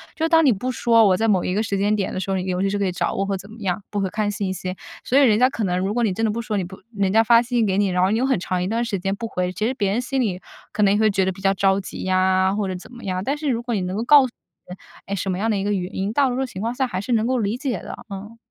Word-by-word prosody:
就 320 +1 0
当 325 0 +5
你 275 - +5
不 245 +5 -2
说 230 -2 +4
我 190 - +4
在 225 +4 0
某 190 -5 +2
一 180 - -1
个 210 - +1
时 200 -2 -1
间 205 +2 +2
点 200 -2 -2
的 - - -3
时 195 +1 -3
候， 190 - +1
你 180 - -2
比 185 - -2
如 185 +2 0
是 200 +1 -1
可 200 - +1
以 - - -1
找 180 - -1
我 - - -1
或 195 -1 -1
怎 200 +3 -12
么 220 - -12
样， 195 +1 -2
不 205 - -2
会 190 - -1
看 210 +1 -1
信 195 -1 -3
息， 185 0 -4 0.3
所 265 - +3
以 - - +5
人 215 -5 +5
家 250 - +6
可 230 - -4
能 180 -2 0
如 195 +3 -1
果 240 - 0
你 215 - +2
真 225 +4 -1
的 215 - +1
不 235 - -3
说， 215 -2 -2
你 190 - 0
不 185 +2 -9 0.2
人 195 -1 0
家 225 +1 +5
发 230 +1 +6
信 245 0 -1
息 225 - +3
给 190 -1 0
你， 200 -1 +2
然 180 0 0
后 185 - +3
你 215 - +1
又 250 - +1
很 265 -7 +1
长 180 0 -2
一 - - -2
段 230 +4 0
时 220 -4 -2
间 195 +2 -2
不 230 +2 -5
回， 180 -4 -2
其 215 +3 -1
实 255 - -1
别 200 -5 0
人 225 +5 0
心 265 +2 -2
里 190 -6 -2 0.3
可 210 - -2
能 195 - +5
也 210 - +1
会 215 -1 +4
觉 195 -1 +1
得 190 - 0
比 185 - -12
较 195 0 +3
着 195 0 +2
急 190 - -7
呀， 185 +1 +2
或 210 -2 -1
者 185 - -3
怎 180 - -11
么 240 -1 -12
样。 185 -1 -2
但 280 +7 -1
是 300 - -4
如 235 -2 0
果 240 -1 -2
你 195 - -1
能 180 +1 -3
够 225 - -1
告 285 +2 +7
诉 - - -4 0.4
别 - - -14
人， - - -34 0.3
哎， 200 - -2
什 195 0 -3
么 180 - -2
样 225 +3 0
的 210 - 0
一 195 - -2
个 205 - +1
原 185 -2 -3
因， 195 +3 -2
大 275 +1 +3
多 250 - -2
数 265 - 0
情 195 -6 -8
况 230 +2 -1
下 260 0 0
还 185 -4 -3
是 245 - -5
能 225 0 +2
够 255 0 +1
理 215 +1 -1
解 250 -7 -2
的。 - - -8
嗯。 205 +3 -8
205 Hz, 400 characters per minute, -22 LUFS, 190-230 Hz, 0.4 s, 告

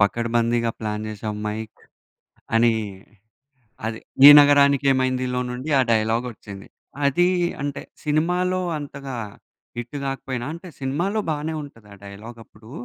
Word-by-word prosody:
పకడ్బందీగా 115 +2 +1
ప్లాన్ 105 -1 -3
చేసావ్ 105 0 -5
మైక్ 110 +1 -6 0.8
అని. 115 0 +4 1.1
అది 110 0 -3 0.3
'ఈ - - +14
నగరానికి 140 -1 +4
ఏమైందిలో' 130 -1 0
నుండి 125 +5 -5
ఆ - - +5
డైలాగ్ 115 +2 +1
ఒచ్చింది. 100 -3 -11 0.4
అది 175 +6 +3 0.3
అంటే 145 -1 -4 0.2
సినిమాలో 180 +5 +1 0.2
అంతగా 140 -3 -7 0.6
హిట్ 120 +4 -6
కాకపోయినా 130 -2 -4
అంటే 170 +3 -9
సినిమాలో 170 +11 -1
బానే 155 +1 -3
ఉంటది 115 -7 -13
ఆ - - -14
డైలాగ్ 105 +4 -10
అప్పుడు. 110 +1 -18
125 Hz, 120 wpm, -23 LUFS, 110-145 Hz, 1.1 s, ఈ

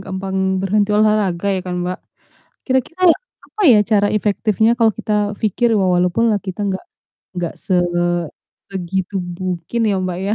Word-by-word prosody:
gampang 190 0 -5 0.3
berhenti 205 +1 +1
olahraga 210 -4 +2
ya 190 - -1
kan, 180 - -3
Mbak? 180 0 -3 0.7
Kira-kira 260 +7 -1 0.4
apa 425 - -6
ya 225 -4 +7
cara 205 -1 +2
efektifnya 215 +1 +1
kalo 225 -1 +5
kita 210 -1 -1
pikir 225 +2 +1
wa 195 - +2
walaupun 190 +6 +2
lah 205 - 0
kita 190 +1 -7
nggak 190 -1 -3 0.5
nggak 175 -2 -3
se 185 - 0 0.9
segitu 190 +1 -3
mungkin 180 +4 -4
ya, 195 - +1
Mbak, 185 -1 -3
ya? 210 - +1
200 Hz, 150 wpm, -18 LUFS, 185-215 Hz, 0.9 s, ya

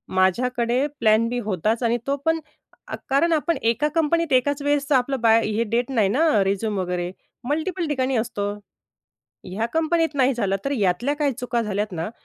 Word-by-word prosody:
माझ्याकडे 240 +7 +1
प्लॅन 220 +1 +3
बी 245 +1 -2
होताच 215 +2 -1
आणि 235 +1 +2
तो 280 - +1
पण 325 0 +2 0.5
अ, - - -4
कारण 325 +5 +3
आपण 320 0 0
एका 230 +6 +1
कंपनीत 330 0 +1
एकाच 280 +3 +2
वेळेसचं 285 -1 +1
आपलं 260 +1 +1
बाय 225 0 +4
हे 215 +2 0
देत 235 +3 -1
नाही 225 -7 +2
ना 260 -4 +3
रिझ्यूम 200 +1 -1
वगैरे 180 -1 -2 0.4
मल्टिपल 335 +3 -1
ठिकाणी 265 -2 0
असतो. 215 -2 -2 1.0
ह्या 195 +5 -3
कंपनीत 325 0 +1
नाही 270 -1 +3
झालं 200 -5 0
तर 275 - 0
यातल्या 220 +3 +1
काही 295 -1 0
चुका 245 -1 -2
झाल्यात 210 0 -2
ना 170 +2 -4
245 Hz, 170 wpm, -23 LUFS, 215-285 Hz, 1.0 s, बाय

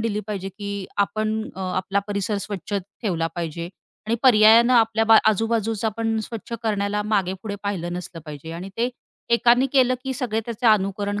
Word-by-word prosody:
दिली 215 -2 -1
पाहिजे 195 -3 -4
की 200 +2 -8 0.4
आपण 215 +1 -2
अ, 190 - -6 0.2
आपला 195 +2 0
परिसर 200 +1 -1
स्वच्छ 205 0 -7
ठेवला 195 -3 -2
पाहिजे 170 0 -4 0.4
आणि 225 - +1
पर्यायानं 230 0 +7
आपल्या 225 -1 +3
बा 225 - +10
आजूबाजूचं 225 0 0
आपण 225 +1 -1
स्वच्छ 230 0 -8
करण्याला 210 -1 0
मागेपुढे 195 +1 -1
पाहिलं 180 -4 -3
नसलं 175 -1 -7
पाहिजे 150 +1 -8
आणि 175 +3 -6
ते 240 +2 +1 0.4
एकानी 245 +2 +4
केलं, 255 -2 +4
की 265 - -2
सगळे 240 -5 -1
त्याचे 235 +1 -2
अनुकरण 205 -1 +2
210 Hz, 160 wpm, -23 LUFS, 195-225 Hz, 0.4 s, बा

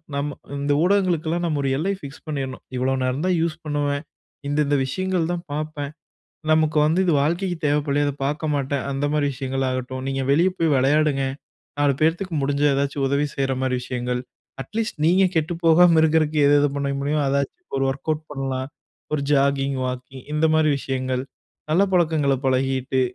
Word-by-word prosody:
நம்ம 145 0 -2 0.2
இந்த 145 +1 0
ஊடகங்களுக்குல்லாம் 175 -3 +1
நாம் 150 -3 0
ஒரு 135 - 0
எல்லை 190 +7 0
ஃபிக்ஸ் 140 -3 -10
பண்ணிறணும். 135 -4 -4
இவ்ளோ 130 +1 +1
நேரம் 130 +5 -1
தான் 185 -1 +2
யூஸ் 165 -1 0
பண்ணுவேன். 145 0 -1 0.4
இந்த 145 +1 0
இந்த 145 - +1
விஷயங்கள் 180 +3 -1
தான் 175 0 -3
பாப்பேன். 150 -1 -4 0.6
நமக்கு 155 0 +3
வந்து 160 +4 +2
இது 175 - +3
வாழ்க்கைக்கு 175 +4 0
தேவைப்படலயா, 145 0 +1
அத 145 - -1
பாக்க 150 +3 -2
மாட்டேன் 140 -1 -1
அந்த 135 +1 -1
மாரி 150 -1 +2
விஷயங்கள் 135 0 -2
ஆகட்டும் 130 0 -4
நீங்க 135 0 -1
வெளியே 175 +6 +4
போய் 165 -4 +2
வெளையாடுங்க, 140 +1 +2 0.6
4 145 -1 +3
பேர்த்துக்கு 170 +3 +1
முடிஞ்சா 145 +1 +1
எதாச்சு 140 +1 -1
உதவி 140 +2 +1
செய்ற 135 -1 0
மாரி 130 -1 0
விஷயங்கள். 125 0 -3 0.4
அட்லீஸ்ட் 215 - -4
நீங்க 185 +4 +4
கெட்டு 160 +2 +1
போகாம 165 0 +6
இருக்கிறதுக்கு 155 -1 +2
எது 145 - +5
எது 145 - +3
பண்ண 140 0 -1
முடியும் 145 +1 0
அதாச்சும் 140 - -2
ஒரு 135 - +1
வொர்க்கவுட் 150 +3 -2
பண்ணலாம். 135 -1 -3 0.4
ஒரு 150 - +1
ஜாகிங், 140 -1 +2
வாக்கிங் 125 +1 -6
இந்த 150 +1 +2
மாரி 155 -1 +3
விஷயங்கள், 130 -1 -2 0.5
நல்ல 175 +5 +4
பழக்கங்கள 155 -5 +2
பழகிட்டு. 130 0 +1
145 Hz, 165 wpm, -23 LUFS, 135-160 Hz, 0.6 s, போகாம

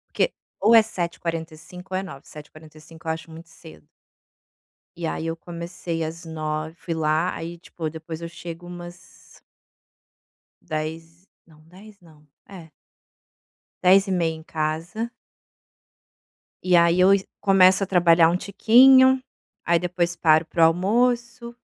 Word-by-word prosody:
Porque - - +1 0.3
ou 220 +4 +4
é - - +9
7h45 170 -2 -6
ou - - +1
é - - -3
9h. 140 -7 -11
7h45 155 +2 -14
eu - - +1
acho 160 +1 -8
muito 165 +1 -12
cedo. 80 - -15 1.1
E 170 -1 -4
aí 160 - -4
eu 165 0 -3
comecei 170 0 -6
às 165 +2 -7
9h, 155 0 -5
fui 170 -1 -5
lá, 160 +2 0
aí, 170 +1 -7
tipo, 165 -1 -7
depois 160 0 -8
eu 170 - -5
chego 170 0 -9
umas 175 0 -13 1.2
10, 165 +3 -6 0.2
não, 155 -2 -21
10 200 +4 -16
não. 155 -3 -21 0.2
É 175 -5 -12 1.1
10h30 185 -3 +3
em 160 - -11
casa 165 +8 -4 1.5
e 180 -1 +3
aí 170 +1 +4
eu 190 +2 +6
e 195 -1 -1 0.2
começo 190 0 +4
a - - -9
trabalhar 170 -3 +4
um 175 - 0
tiquinho, 260 +7 +5 0.4
aí 170 0 +2
depois 175 0 -2
paro 155 -1 +3
pro 165 - -1
almoço, 235 +7 0
170 Hz, 135 wpm, -23 LUFS, 160-185 Hz, 1.5 s, é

